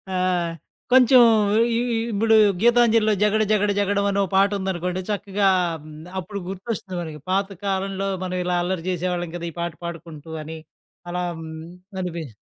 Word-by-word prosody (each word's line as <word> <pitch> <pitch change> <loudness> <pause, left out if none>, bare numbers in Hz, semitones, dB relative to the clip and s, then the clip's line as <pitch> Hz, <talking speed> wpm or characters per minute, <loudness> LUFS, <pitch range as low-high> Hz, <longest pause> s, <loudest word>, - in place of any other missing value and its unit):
ఆహ్, 180 -2 0 0.4
కొంచెం 255 0 +7 0.5
ఇ - - +2 0.2
ఇ - - +1 0.2
ఇప్పుడు 220 +2 +3 0.3
గీతాంజలిలో 230 -2 +4
'జగడ 210 +1 +3
జగడ 210 -1 +2
జగడం' 200 0 +1
అని 200 - 0
ఓ - - +1
పాట 195 +1 +5
ఉందనుకోండి 185 -1 -2
చక్కగా 200 -1 +1 0.3
హ్మ్, 155 0 -11 0.2
అప్పుడు 200 +3 -6
గుర్తొస్తుంది 190 -1 -5
మనకి, 155 -3 -7
పాత 195 +1 +1 0.2
కాలంలో 195 0 -1 0.2
మనం 185 0 -3
ఇలా 180 0 +1
అల్లరి 180 -1 -3
చేసేవాళ్ళం 175 -1 -2
కదా! 170 0 -5
ఈ - - -21
పాట 170 -1 -3
పాడుకుంటూ 165 -2 -8
అని 160 +1 -7 0.5
అలా. 180 0 -2 0.8
అనిపి 170 -3 -4
190 Hz, 150 wpm, -23 LUFS, 175-205 Hz, 0.8 s, కొంచెం